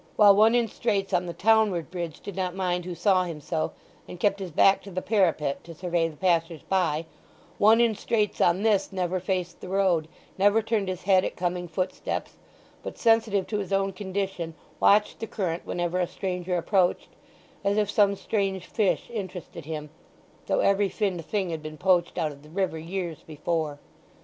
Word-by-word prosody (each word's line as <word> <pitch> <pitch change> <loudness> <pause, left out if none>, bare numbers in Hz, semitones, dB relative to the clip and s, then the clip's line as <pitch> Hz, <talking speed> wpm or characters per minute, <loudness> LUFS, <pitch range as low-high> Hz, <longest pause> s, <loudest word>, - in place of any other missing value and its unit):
While 205 -2 +7
one 220 +3 +5
in 240 -1 +3
straits 200 -3 -1
on 180 0 +1
the - - -3
townward 210 -6 +2
bridge 170 -4 -5
did 200 - -7
not 185 -1 -2
mind 180 -2 -1
who 180 -1 -5
saw 185 +1 +3
him 165 -4 -5
so, 155 +2 -2 0.4
and 180 - -9
kept 200 +1 +2
his 190 -2 -5
back 195 +5 +4
to 200 - -11
the 185 -1 -3
parapet 180 -9 +1
to 165 -1 -10
survey 170 -1 0
the 155 -2 -10
passers 165 -2 0
by, 165 -4 0 0.5
one 220 +3 +6
in 235 -2 +4
straits 210 0 -1
on 180 +3 +3
this 210 -3 +2
never 185 -1 -1
faced 180 -1 -3
the 185 - -8
road, 185 -5 +2 0.3
never 205 +3 +4
turned 220 -3 0
his 185 -2 -4
head 190 -1 +4
at - - -3
coming 175 0 -2
footsteps, 180 +3 -3 0.4
but, - - -7
sensitive 225 -4 +3
to 210 - -2
his 200 -1 -5
own 195 0 +1
condition, 190 -4 -4 0.2
watched 210 +1 +4
the 225 - -4
current 175 -6 -3
whenever 175 +1 -1
a 180 - +1
stranger 180 -1 -3
approached, 180 +1 +1 0.5
as 200 +1 +1
if 210 -1 +1
some 200 -1 +4
strange 195 -3 -2
fish 210 -5 0
interested 185 -6 -6
him, 150 -1 -6 0.6
though - - +2
every 200 0 +3
finned 190 -6 -2
thing 190 +1 -2
had 160 -1 -4
been 155 0 -8
poached 180 0 +2
out 160 -3 0
of 140 -1 -13
the 150 - -16
river 185 -1 -1
years 170 -1 -4
before. 155 -1 -2
185 Hz, 190 wpm, -26 LUFS, 170-200 Hz, 0.6 s, While